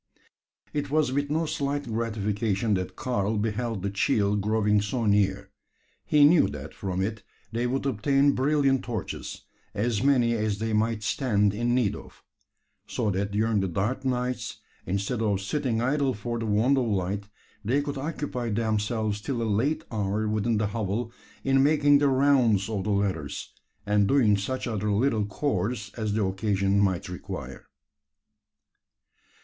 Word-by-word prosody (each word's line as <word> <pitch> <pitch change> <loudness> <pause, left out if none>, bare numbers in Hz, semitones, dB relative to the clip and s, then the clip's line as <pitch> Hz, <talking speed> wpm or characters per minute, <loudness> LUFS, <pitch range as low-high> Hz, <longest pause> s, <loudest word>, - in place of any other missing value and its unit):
It 145 -1 -2
was 150 -2 +2
with 145 +1 -1
no 160 +2 0
slight 145 -1 -2
gratification 110 -2 -1
that 95 -1 -2
Karl 110 -4 -1
beheld 110 -1 -2
the 100 - -1
"cheel" 100 0 +1
growing 105 0 +2
so 115 +3 -2
near. 100 -1 +1 0.6
He 150 -1 +6
knew 160 +2 +6
that 75 +1 -7
from 95 -1 -2
it 105 +1 -3 0.3
they 120 +2 -1
would 135 +2 -2
obtain 135 +3 +3
brilliant 135 -1 +2
torches 115 -5 -5 0.3
as 110 0 0
many 125 -4 +3
as 110 -2 -1
they 110 +1 -2
might 110 0 0
stand 105 -4 +1
in 120 +3 0
need 105 -5 +1
of; - - -13 0.6
so 105 - -1
that 100 +2 -1
during 110 0 +1
the 95 - 0
dark 105 +10 -2
nights, 125 -1 -2 0.3
instead 100 +5 -1
of 105 -3 +1
sitting 120 +2 -1
idle 135 0 +1
for 120 +3 -4
the 115 - -3
want 115 +7 +3
of 125 - 0
light, 100 0 -1 0.4
they 125 +7 +2
could 145 -1 -3
occupy 140 -5 -3
themselves 110 -1 -1
till 125 +2 -3
a - - 0
late 130 +9 0
hour 105 0 -1
within 110 +1 0
the 105 - +1
hovel, 110 +2 -2 0.3
in 135 0 +3
making 145 0 +5
the 145 - +3
"rounds" 130 -7 +3
of 100 -4 -2
the - - -1
ladders, 100 -8 -2 0.3
and 105 -1 +3
doing 115 -6 +4
such 115 +7 -3
other 105 -3 -1
little 110 -1 +1
"chores" 105 -3 -2
as 110 -3 -2
the 105 -1 +1
occasion 100 0 +1
might 95 -3 +1
require. 90 -1 -7
110 Hz, 155 wpm, -26 LUFS, 100-130 Hz, 0.6 s, He